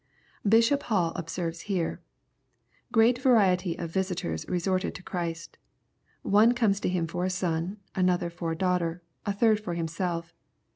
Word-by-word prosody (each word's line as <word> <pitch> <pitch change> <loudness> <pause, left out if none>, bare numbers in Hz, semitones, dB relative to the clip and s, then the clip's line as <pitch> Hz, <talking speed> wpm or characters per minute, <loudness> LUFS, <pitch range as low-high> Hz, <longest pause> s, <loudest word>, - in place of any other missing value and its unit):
] 205 - -5
Bishop 230 +5 +5
Hall 180 -7 +2
observes 165 0 -4
here: 180 -4 -1 0.5
" - - -40
Great 235 +2 +4
variety 190 -9 +3
of 165 -1 -5
visitors 185 -1 -2
resorted 185 +1 0
to 180 - -9
Christ 170 -2 -5 0.6
One 220 +4 +5
comes 210 -5 +2
to - - -1
Him 180 -2 0
for 175 +2 -3
a - - +1
flon; 180 +1 -2 0.2
another 180 -2 +1
for 170 -1 -4
a - - -6
daughter; 175 -1 0 0.2
a - - +2
third 215 +1 +3
for 180 -5 -4
himself. 170 0 -3
180 Hz, 155 wpm, -28 LUFS, 170-200 Hz, 0.6 s, Bishop